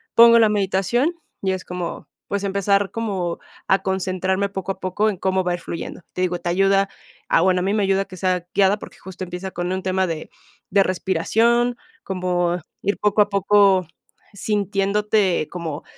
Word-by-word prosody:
pongo 235 0 +8
la 220 -1 +5
meditación 205 - +1 0.3
y 190 -1 0
es 185 - -5
como, 180 -1 -5 0.2
pues, 200 0 -2
empezar 200 0 +1
como 195 -7 -2 0.3
a 195 - +4
concentrarme 190 +1 -1
poco 195 -1 -4
a - - -22
poco 195 +4 0
en 195 - -3
cómo 190 0 0
va 180 - -1
a - - +1
ir 175 - -10
fluyendo, 170 +2 -6
te 180 - -3
digo, 180 -1 0
te 175 - -3
ayuda 195 +2 +3 0.4
a - - +4
bueno, 185 0 +3
a - - -1
mí 195 +2 0
me 210 -2 +1
ayuda 195 0 +1
que 185 - -11
sea 180 -1 0
guiada, 200 +1 +3
porque - - -11
justo 190 0 -8
empieza 180 +1 -6
con 175 +1 -3
un 185 0 -2
tema 190 0 +1
de 160 -2 -5 0.4
de 200 -1 +5
respiración, 225 +7 +1 0.3
como 180 -2 0 0.2
ir 200 - 0
poco 210 0 +3
a 205 - +3
poco 200 -1 +4 0.5
sintiéndote 200 -2 +1
como 165 -4 -5
190 Hz, 185 wpm, -22 LUFS, 180-200 Hz, 0.5 s, pongo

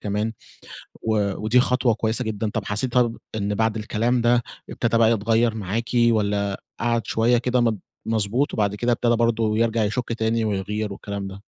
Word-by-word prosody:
كمان، 105 +2 -2 0.7
و 105 -3 +1
ودي 120 +4 +4
خطوة 125 -1 +2
كويّسة 110 +3 -1
جدًا. 110 0 -2
طب 105 -1 -3
حسيتِ 115 +4 -1
طب 120 -2 +2 0.2
إن 105 -1 -1
بعد 110 0 +1
الكلام 115 +3 0
ده 120 0 +3 0.3
ابتدى 115 -1 0
بقى 115 0 +5
يتغيّر 115 +1 +2
معاكِ؟ 110 +3 -3
والّا 105 -4 +2 0.2
قّعد 115 -2 0
شويّة 120 +2 +3
كده 125 +1 +1
مض 110 -4 +1 0.3
مضبوط، 115 +5 0
وبعد 105 -1 0
كده 120 +3 0
ابتدى 120 0 +2
برضو 115 -2 +1
يرجع 115 0 +1
يشُك 115 +3 -2
تاني 110 0 0
ويغير 105 +1 -2
والكلام 100 0 -5
ده؟ 95 +1 -10
110 Hz, 170 wpm, -23 LUFS, 105-120 Hz, 0.7 s, بقى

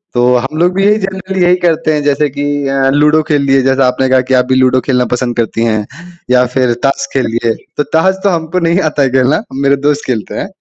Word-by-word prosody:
तो 120 - +2
हम 135 +5 -4
लोग 175 +2 +2
भी 195 0 +1
यही 210 +1 +3
जनरली 190 -1 -4
यही 175 +1 +4
करते 160 -2 +1
हैं 150 -1 -1
जैसे 145 0 +1
कि 145 +2 -5 0.2
अ, 135 0 +1
लूडो 150 +2 +3
खेल 145 -2 +2
लिए 135 -1 +3
जैसा 135 0 +2
आपने 130 +1 0
कहा 130 -1 +3
कि - - +1
आप 125 0 +3
भी 130 0 0
लूडो 130 0 +3
खेलना 125 -2 0
पसंद 125 -1 -2
करती 115 0 -1
हैं 110 -2 -1 0.5
या 125 0 +4
फ़िर 125 -2 +2
ताश 140 0 0
खेल 135 -2 0
लिए। 115 -1 0 0.2
तो 150 - +1
ताश 190 +6 +1
तो 200 - +3
हमको 165 +1 -2
नहीं 170 +3 +2
आता 150 - -2
है 135 - +1
खेलना 135 - +1
मेरे 140 +1 +1
दोस्त 150 0 0
खेलते 115 -5 -3
हैं। 195 - -5
140 Hz, 245 wpm, -12 LUFS, 130-160 Hz, 0.5 s, यही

